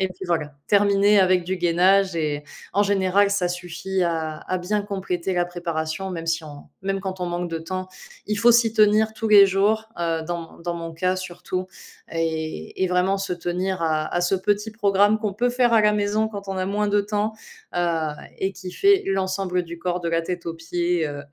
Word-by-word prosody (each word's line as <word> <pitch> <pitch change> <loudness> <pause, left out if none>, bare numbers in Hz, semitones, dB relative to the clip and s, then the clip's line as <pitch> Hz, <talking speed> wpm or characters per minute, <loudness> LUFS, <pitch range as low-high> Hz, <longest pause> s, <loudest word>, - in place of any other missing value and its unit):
et 190 - +1
puis 185 +1 -9
voilà. 160 -4 -1
Terminer 200 0 +4
avec 185 -1 +3
du 190 +2 -2
gainage 185 +2 +3
et 150 -2 -1 0.3
en 200 - +3
général, 200 0 +2
ça 200 -3 +1
suffit 180 +2 -3
à 160 -2 -1
à 185 - -2
bien 205 +4 -1
compléter 190 -3 -3
la 175 -1 +1
préparation, 175 +1 -4
même 165 -2 -5
si 165 0 0
on 145 -2 -10 0.2
même 195 0 -1
quand 190 -1 -5
on 180 - -1
manque 175 0 -3
de 165 -1 -3
temps, 185 +3 -5 0.4
il 210 - -1
faut 230 +3 +5
s'y 230 -1 +4
tenir 215 0 +4
tous 220 0 -2
les 205 -2 +9
jours, 210 +3 +1
heu, 165 -1 0
dans 170 -1 -5
mo - - -16
dans 175 0 -2
mon 165 -1 -6
cas 180 +3 0
surtout 185 0 -5 0.4
et 160 - -3
et 185 - +2
vraiment 180 +2 +2
se 195 -1 -3
tenir 180 +2 -2
à 155 -1 0
à 175 - +1
ce 175 +2 +2
petit 205 +3 0
programme 205 0 +3
qu'on 210 -3 -2
peut 245 +4 +1
faire 245 -1 +2
à 225 - +6
la 210 0 +4
maison 210 +1 +1
quand 200 -2 -8
on 195 - -3
a 185 - -1
moins 205 +1 0
de 205 0 +3
temps, 210 +1 -1 0.4
heu 165 -3 0 0.3
et 190 +1 -1
qui 185 -1 -8
fait 400 - +4
l'ensemble 190 -1 0
du 170 0 -9
corps, 180 +1 -2
de 170 - -2
la 165 0 +1
tête 175 0 -5
aux 165 - -3
pieds, 170 0 -1
heu, 145 -1 -6
185 Hz, 215 wpm, -23 LUFS, 170-200 Hz, 0.4 s, les